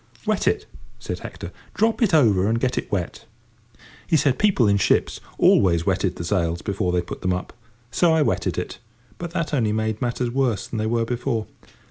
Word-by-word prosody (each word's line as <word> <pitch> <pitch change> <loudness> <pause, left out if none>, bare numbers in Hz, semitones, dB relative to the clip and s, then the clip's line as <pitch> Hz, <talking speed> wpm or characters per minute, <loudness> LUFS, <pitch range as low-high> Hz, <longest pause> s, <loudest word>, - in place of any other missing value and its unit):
"Wet - - 0
it," - - +1 0.3
said - - -5
Hector; - - -8 0.2
"drop 225 +2 +1
it 225 - +3
over 105 - +4
and 115 +1 +1
get 130 +1 0
it - - -4
wet." 90 -4 -3 0.8
He 160 - +3
said 140 -2 +1
people 195 - +3
in 100 0 +3
ships 100 - +1 0.2
always 85 -3 +4
wetted 95 -1 0
the - - -5
sails 85 -2 -1
before 100 -2 -1
they 90 0 +1
put - - -8
them 90 0 +1
up. 90 - -5 0.4
So 175 -2 +3
I 160 -1 +4
wetted 115 - -1
it; - - -4 0.4
but 170 - -4
that 165 -4 -2
only 115 -7 +2
made 110 0 -1
matters 120 0 -1
worse 125 -4 0
than 115 - -5
they 110 - 0
were 115 0 +1
before. 120 -2 -2
115 Hz, 195 wpm, -23 LUFS, 95-135 Hz, 0.8 s, over